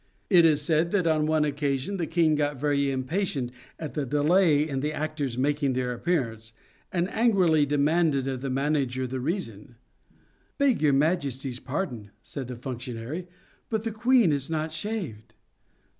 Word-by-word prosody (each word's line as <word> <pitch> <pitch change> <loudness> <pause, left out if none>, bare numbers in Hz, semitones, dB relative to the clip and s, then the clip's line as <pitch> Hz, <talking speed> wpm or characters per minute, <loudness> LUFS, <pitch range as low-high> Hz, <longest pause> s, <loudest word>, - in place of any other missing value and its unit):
It 170 -2 +7
is 150 -2 +3
said 160 +2 +2
that 190 -4 +2
on 155 -2 +2
one 155 -1 +2
occasion 145 +4 -1
the 170 -3 -2
King 165 -2 +3
got 145 -2 0
very 140 -1 +1
impatient 135 -1 -2 0.3
at 155 -3 -6
the 150 - -1
delay 150 +3 +3
in 135 -3 -2
the 150 +3 -1
actors 155 -5 -3
making 140 0 +1
their 125 -1 -1
appearance, 115 -7 -2 0.4
and 175 0 0
angrily 185 -10 +3
demanded 145 -1 +2
of 130 -2 -3
the 135 - -3
manager 135 -1 0
the 130 +1 -4
reason. 125 - -4 0.4
" - - -38
Beg 280 -4 +2
your 150 -2 +4
Majesty's 135 -4 0
pardon," 125 - -4
said 135 -4 -6
that 125 -2 -8
func 130 -2 -4
tionary, 130 +11 -5 0.2
" - - -35
but 220 -2 -1
the 225 - -2
queen 235 -3 +4
is 140 0 -2
not 160 0 -2
shaved." 150 - -5
150 Hz, 170 wpm, -27 LUFS, 130-165 Hz, 0.4 s, It